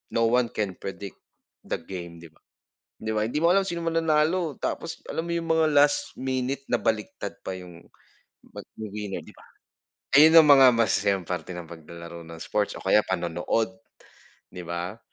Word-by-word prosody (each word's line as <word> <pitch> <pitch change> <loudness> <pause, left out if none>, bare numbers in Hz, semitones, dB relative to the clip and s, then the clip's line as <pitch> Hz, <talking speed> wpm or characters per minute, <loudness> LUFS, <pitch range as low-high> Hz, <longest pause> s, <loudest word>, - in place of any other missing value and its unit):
no 115 0 +3
one 125 -1 +3
can 105 -3 -1
predict 100 0 -7 0.5
the - - -1
game 85 -1 -8
'di 80 - -13
ba? - - -29 0.6
'Di 110 0 -3
ba 110 0 0
hindi 150 +6 -2
mo 170 - +5
alam 195 0 +3
sino 170 -2 -3
mananalo. 165 -1 +1
Tapos 165 -1 -4
alam 165 +1 -3
mo - - -3
yung 165 -1 -3
mga 160 -1 +3
last 145 0 +3
minute 130 +1 -2
nabaliktad 110 -3 -1
pa - - -4
yung 90 -2 -12 0.7
'pag - - -9
winner. 105 -2 -5
'di - - -14
ba. - - -18 0.7
Ayun 160 +2 +9
ang 155 - +6
mga 135 -2 +9
masasayang 100 -4 +1
parte 90 0 -4
ng 90 -1 -7
paglalaro 85 +1 -10
ng 80 0 -10
sports 105 -1 -1
o - - -11
kaya 105 +2 +5
panonood, 90 +4 -1 0.8
'di 90 - -7
ba? 85 +5 -5
110 Hz, 170 wpm, -26 LUFS, 90-150 Hz, 0.8 s, Ayun